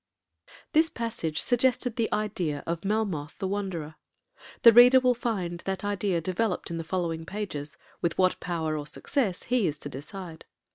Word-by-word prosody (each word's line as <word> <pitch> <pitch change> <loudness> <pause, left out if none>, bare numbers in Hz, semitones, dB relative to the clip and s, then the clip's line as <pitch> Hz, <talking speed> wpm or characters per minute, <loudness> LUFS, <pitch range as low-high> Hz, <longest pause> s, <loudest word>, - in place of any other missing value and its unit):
This 320 +1 +4
passage 220 - -3
suggested 245 -1 +1
the 230 -3 0
idea 180 -9 -1
of 170 0 -3
'Melmoth 195 -8 -1
the 190 - -2
Wanderer.' 185 -6 -4 0.7
The 230 - +10
Reader 250 +3 +8
will 250 -1 +4
find 195 -8 -3
that 195 +1 -2
idea 200 -3 0
developed 185 +3 -1
in 165 - -3
the - - -3
following 165 -1 -2
pages, 165 -6 -5 0.2
with 170 -1 0
what 185 -1 +2
power 160 -3 -2
or 150 -1 -4
success 215 - -1
he 245 -5 +1
is 150 - -2
to 145 - -7
decide. 160 +5 -9
190 Hz, 160 wpm, -27 LUFS, 165-225 Hz, 0.7 s, The